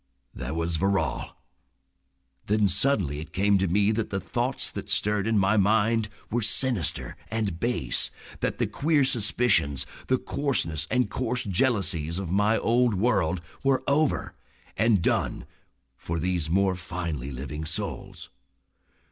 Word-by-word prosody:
"There 70 +5 -5
was 85 0 -1
Verrall." 95 +2 -1 1.1
Then 105 0 +3
suddenly 95 - +1
it 80 - -9
came 100 +1 +3
to 95 - +1
me 100 +4 +2
that 110 0 -2
the 95 - -2
thoughts - - -2
that - - -7
stirred 105 0 +2
in 115 -1 +2
my 100 +2 +3
mind 110 +2 +2 0.2
were 120 +2 0
sinister 110 - +3
and 105 -7 -2
base, 120 +3 +1 0.3
that - - -2
the - - +1
queer 150 -1 +1
suspicions, 115 - +2 0.2
the 130 - +2
coarseness 125 - -2
and 125 0 +1
coarse 125 0 -1
jealousies 95 - +1
of 95 -3 -4
my 105 +3 +2
old 120 -1 +2
world 95 -5 +1 0.2
were 135 -1 +2
over 150 +1 +1 0.4
and 110 -6 +2
done - - 0 0.5
for 85 - -4
these 85 -1 -1
more 95 +2 +2
finely 85 -6 -5
living 70 +4 -6
souls. 80 0 -5
100 Hz, 140 wpm, -26 LUFS, 85-115 Hz, 1.1 s, Then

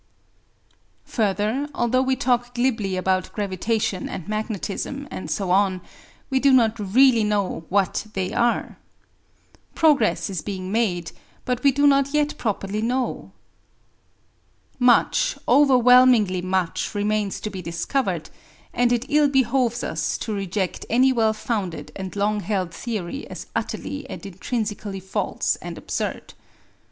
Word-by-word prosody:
Further, 215 +6 -1
although 240 +2 +2
we 265 0 +1
talk 245 -2 0
glibly 225 -7 0
about 185 0 0
gravitation 205 -1 -2
and 170 - -6
magnetism, 215 +6 -4
and - - -6
so 195 -3 -1
on, 190 -1 +3 0.5
we 265 - +3
do 275 +1 +4
not 235 -3 +4
really 230 +3 +4
know 205 -5 -1
what 200 +2 0
they 185 -1 -2
are. 240 0 0 1.0
Progress 295 -9 +3
is 190 -6 -4
being 185 +1 -5
made, 185 -7 0 0.3
but 250 -1 -1
we 280 - +5
do 285 +2 +2
not 275 0 +3
yet 300 0 +1
properly 210 -1 -2
know. 250 +3 -2 1.5
Much, 250 - +3
overwhelmingly 250 -8 +5
much, 185 +1 -1
remains 205 -1 -1
to 215 - -5
be 190 -1 -6
discovered, 170 - -2 0.4
and 245 0 +2
it 240 +1 +1
ill 300 0 +4
behoves 255 -2 +1
us - - -2
to 220 - -4
reject 195 -1 -2
any 255 +3 +4
well 225 -3 +3
founded 215 -5 -4
and 190 -1 -6
long 210 +1 +1
held 185 -3 -2
theory 220 - -5
as - - -8
utterly 285 -2 -4
and - - -8
intrinsically 205 0 -4
false 190 +1 -1
and - - -8
absurd. - - -4
220 Hz, 130 wpm, -23 LUFS, 195-255 Hz, 1.5 s, we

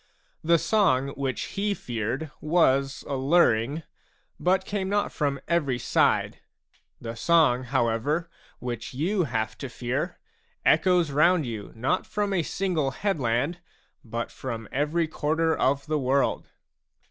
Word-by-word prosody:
The 170 +1 +4
song 155 -10 +2
which 135 -2 -3 0.2
he 205 0 +1
feared 120 - -4
was 140 -4 +2
alluring, 140 -1 +2 0.6
but 185 +1 +2
came 195 -2 -2
not 205 0 0
from 140 -2 -1
every 150 -7 +1
side; - - +1 0.6
the 115 -1 -6
song, 130 -2 +3
however, 130 +6 0 0.3
which 120 -1 -5
you 180 +6 +1
have 110 -4 -2
to 135 - -5
fear, 120 +1 -3 0.5
echoes 170 -1 +4
round 155 +3 +4
you 110 -4 -6
not 130 +11 0
from 205 -1 -1
a 180 - +2
single 165 -4 -1
headland, 140 - -1 0.4
but 115 0 -4
from 115 -4 -6
every 150 +4 0
quarter 160 +1 0
of 140 +2 +1
the 155 -1 0
world. 135 +1 +1
145 Hz, 125 wpm, -26 LUFS, 125-170 Hz, 0.6 s, The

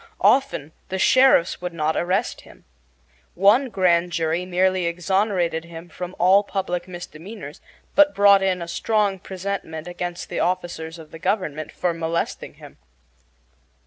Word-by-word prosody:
Often 260 - +2 0.2
the 190 - -2
sheriffs 255 -6 +4
would 180 -1 -5
not 155 0 0
arrest 190 +6 -1
him. - - -18 0.7
One 210 +8 +4
grand 180 -4 +2
jury 165 +2 -1
not - - -13
merely 185 0 +2
exonerated 180 -1 0
him 170 +1 -10
from 180 +1 -7
all 185 +3 +5
public 190 -3 -3
misdemeanors, 175 -1 -9 0.3
but 295 0 +5
brought 200 -1 +6
in 185 -2 0
a - - -8
strong 205 +1 0
presentment 185 -4 -5
against 175 0 -5
the - - -3
officers 175 -2 -2
of 160 -2 -13
the 165 - -10
government 170 -5 -2
for 175 -1 -1
molesting 165 0 -3
him. - - -15
180 Hz, 145 wpm, -23 LUFS, 170-195 Hz, 0.7 s, brought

